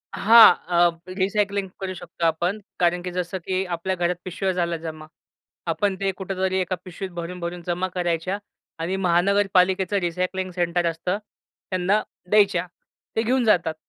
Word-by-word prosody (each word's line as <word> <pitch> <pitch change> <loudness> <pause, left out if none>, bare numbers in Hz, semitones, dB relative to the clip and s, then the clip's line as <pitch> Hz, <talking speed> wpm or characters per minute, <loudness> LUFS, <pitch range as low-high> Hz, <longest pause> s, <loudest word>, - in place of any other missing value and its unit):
हां, 225 -3 +8
अ, 175 -1 +4 0.3
रिसायकलिंग 200 0 0
करू 190 -1 -3
शकतो 170 0 -5
आपण 175 +5 +1 0.2
कारण 175 0 +2
की 180 0 -5
जसं, 180 +1 -3
की 185 +2 -1
आपल्या 185 +3 -2
घरात 175 0 0
पिशव्या 190 +1 -1
झाला 170 -1 -1
जमा. 155 -1 -7 0.7
आपण 200 +2 0
ते 195 -1 0
कुठेतरी 190 -1 -1
एका 185 0 -1
पिशवीत 185 +1 -6
भरून-भरून 175 0 -5
जमा 180 +2 0
करायच्या 175 +2 -1 0.4
आणि 170 +4 -1
महानगरपालिकेचं 190 +1 +2
रिसायकलिंग 185 +1 -2
सेंटर 175 -1 0
असतं 175 +4 -2 0.5
त्यांना 185 +3 +2 0.3
द्यायच्या. 200 -4 +3 0.5
ते 225 - +2
घेऊन 250 +2 +2
जातात. 175 -7 +3
180 Hz, 145 wpm, -24 LUFS, 175-195 Hz, 0.7 s, हां